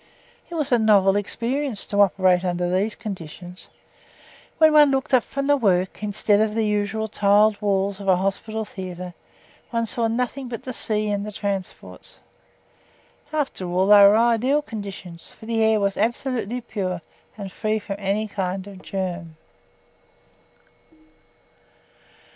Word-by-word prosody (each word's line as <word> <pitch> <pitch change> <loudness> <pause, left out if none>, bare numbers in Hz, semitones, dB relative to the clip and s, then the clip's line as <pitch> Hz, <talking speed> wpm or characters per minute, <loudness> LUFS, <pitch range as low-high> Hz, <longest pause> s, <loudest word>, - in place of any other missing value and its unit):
It 345 - -7
was 300 -5 -2
a 245 - +4
novel 200 -3 +4
experience 235 +4 -1
to 205 0 +1
operate 185 -2 +3
under 175 -1 -1
these 205 +4 0
conditions. 180 -4 -8 0.9
When 315 -1 +5
one 300 -1 +7
looked 270 0 -1
up 255 - +6
from 275 +4 -4
the 290 +1 +4
work, 190 -8 +1
instead 205 0 +1
of 215 -1 0
the 225 -1 +1
usual 210 +1 -1
tiled 210 0 +3
walls 200 -1 0
of 200 - -8
a 190 - +5
hospital 205 +4 -2
theatre, 180 -3 -7 0.6
one 230 -1 -1
saw 230 +1 +1
nothing 250 +3 -2
but 235 -2 -6
the 255 - -5
sea 215 -2 -1
and 200 0 -1
the 210 - -6
transports. 200 -2 -6 1.1
After 275 - -2
all, 180 +2 +1
they 205 0 +8
were 200 +2 +7
ideal 240 +5 +2
conditions; 195 -7 -8
for - - -15
the 225 0 -1
air 220 -1 +3
was 200 -1 0
absolutely 240 +1 -1
pure 185 -7 -4 0.3
and 200 -2 -7
free 215 +3 -1
from 200 -2 -5
any 205 +2 -1
kind 190 -2 -3
of 195 -2 -11
germ. 175 -4 -5
210 Hz, 150 wpm, -23 LUFS, 190-230 Hz, 1.1 s, they